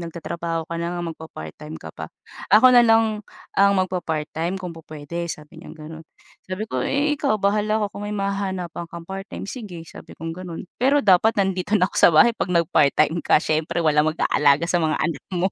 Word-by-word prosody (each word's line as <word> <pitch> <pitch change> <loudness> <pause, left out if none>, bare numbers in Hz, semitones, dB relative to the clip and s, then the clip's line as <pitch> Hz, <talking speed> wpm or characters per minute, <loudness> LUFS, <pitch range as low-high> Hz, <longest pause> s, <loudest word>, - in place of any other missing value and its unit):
nagtatrabaho 170 0 -4
ka 170 - -7
na 170 +1 -3
ngang 170 -1 -4
magpapart-time 80 - -9
ka 80 0 -10
pa. 80 -1 -8 0.5
Ako 255 +4 +7
nalang 225 -3 +4 0.4
ang 200 0 +6
magpapart-time 170 -1 -3
kung 180 -2 -6
pupuwede," 165 +1 -7
sabi 155 +1 -8
niyang 170 - -12
gano'n. 160 +1 -10 0.4
Sabi 185 +3 -3
ko, 130 - -1
"Eh, 285 - +1
ikaw 215 - +1
bahala 210 +2 +1
ka - - 0
kung 205 0 -6
may 210 - -3
mahahanapan 190 -4 -3
kang 170 0 -9
part-time, 195 +2 -7
sige," 200 -7 -8
sabi - - -13
kong 165 0 -5
gano'n. 175 -1 -7 0.2
"Pero 280 +3 +3
dapat 205 +3 +4
nandito 195 +1 +1
na 185 - +3
ako - - -17
sa - - +8
bahay 235 +10 +6
'pag 200 - -3
nagpart-time 155 -1 +2
ka - - +3
siyempre 165 +2 -1
walang 150 0 +3
mag-aalaga 150 -1 +2
sa 175 - +2
mga 155 -1 +1
anak 165 +1 -2
mo." 185 +3 +1
170 Hz, 185 wpm, -22 LUFS, 160-200 Hz, 0.5 s, sa